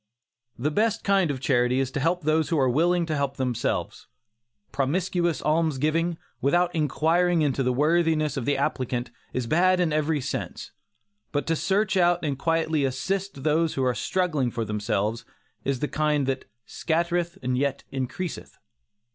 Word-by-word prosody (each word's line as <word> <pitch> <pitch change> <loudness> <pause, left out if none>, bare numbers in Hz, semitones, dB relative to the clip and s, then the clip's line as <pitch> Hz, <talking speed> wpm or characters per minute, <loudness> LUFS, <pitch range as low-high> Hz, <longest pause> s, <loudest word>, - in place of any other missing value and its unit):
The 145 +6 -1
best 215 +6 +1
kind 195 -4 +3
of 140 -2 -2
charity 125 -1 +2
is 135 -1 -1
to 140 - -2
help 170 +4 0
those 155 +1 +2
who 165 - +1
are 135 -2 +3
willing 170 +7 +2
to 155 -2 -2
help 140 -1 -2
themselves. 125 -3 -2 0.6
Promiscuous 170 +4 0
almsgiving, 160 +2 +1 0.2
without 175 +5 +2
inquiring 165 +2 +2
into 140 -2 +1
the 125 -1 +2
worthiness 155 +1 +2
of 135 -4 -3
the 145 +1 +1
applicant, 125 -3 -2 0.2
is 125 -1 -2
bad 180 +7 +3
in 170 -4 +1
every 155 0 +1
sense. 130 - -5 0.6
But 145 -2 -1
to 165 - +1
search 195 +3 +1
out 175 -2 +3
and 145 -2 0
quietly 160 0 0
assist 180 +4 -2
those 160 +1 +1
who 135 - 0
are 125 -1 +2
struggling 155 -5 0
for 115 -1 -3
themselves, 105 +1 -1 0.4
is 135 -2 -1
the 150 - +1
kind 150 -2 +1
that 130 0 -2 0.2
"scattereth 170 +1 -1
and 125 0 0
yet 140 +1 -1
increaseth." 135 +6 -5
150 Hz, 160 wpm, -25 LUFS, 135-170 Hz, 0.6 s, kind